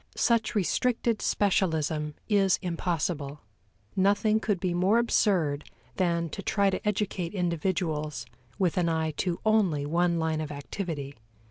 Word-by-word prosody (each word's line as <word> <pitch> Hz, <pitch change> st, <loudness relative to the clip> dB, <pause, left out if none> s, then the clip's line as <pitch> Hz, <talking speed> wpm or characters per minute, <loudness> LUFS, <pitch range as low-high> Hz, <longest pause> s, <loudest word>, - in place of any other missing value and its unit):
Such 230 Hz, -1 st, +1 dB
restricted 225 Hz, +4 st, +1 dB
specialism 160 Hz, -6 st, 0 dB
is 200 Hz, -3 st, +3 dB
impossible; 165 Hz, -4 st, -2 dB, 0.5 s
nothing 205 Hz, +3 st, +3 dB
could 205 Hz, -4 st, -1 dB
be 180 Hz, -1 st, -1 dB
more 185 Hz, +6 st, +3 dB
absurd 180 Hz, -11 st, +1 dB, 0.3 s
than 170 Hz, -2 st, +1 dB
to 200 Hz, -, -6 dB
try 200 Hz, -1 st, +2 dB
to -, -, -3 dB
educate 195 Hz, -3 st, -1 dB
individuals 160 Hz, -6 st, -1 dB, 0.3 s
with 185 Hz, -4 st, +1 dB
an 170 Hz, -1 st, +2 dB
eye 160 Hz, -1 st, 0 dB
to 175 Hz, -2 st, -1 dB
only 195 Hz, -10 st, +2 dB
one 170 Hz, +3 st, +1 dB
line 160 Hz, -1 st, 0 dB
of 150 Hz, -1 st, -5 dB
activity. 145 Hz, -1 st, -5 dB
175 Hz, 130 wpm, -28 LUFS, 155-200 Hz, 0.5 s, is